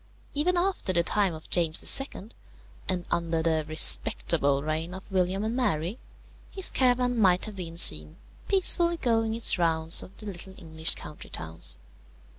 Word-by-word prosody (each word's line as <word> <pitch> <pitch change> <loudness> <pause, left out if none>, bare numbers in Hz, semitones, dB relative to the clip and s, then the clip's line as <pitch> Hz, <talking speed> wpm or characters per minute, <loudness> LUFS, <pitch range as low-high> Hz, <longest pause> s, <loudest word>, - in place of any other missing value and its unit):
Even 350 +5 0
after 360 - -1
the 170 -2 +1
time 195 -1 0
of 155 - -11
James 170 +8 +4
II., 225 -5 -10 0.6
and 180 -2 -2
under 165 -1 -2
the 160 -1 -1
"respectable" 145 -2 +4
reign 160 +3 -4
of 190 - -10
William 190 +1 -1
and 220 +2 -3
Mary, 185 -4 -2 0.5
his 385 -2 0
caravan 250 -1 0
might 185 -3 +2
have 215 -2 -10
been 170 -2 -8
seen 75 - +4 0.3
peacefully 350 -3 +3
going 225 -5 -1
its 230 -4 +1
rounds 165 -1 +1
of 195 - -14
the 215 - -8
little 190 -1 -7
English 160 -2 +2
country 150 - -12
towns. 80 0 -3
180 Hz, 155 wpm, -26 LUFS, 160-230 Hz, 0.6 s, James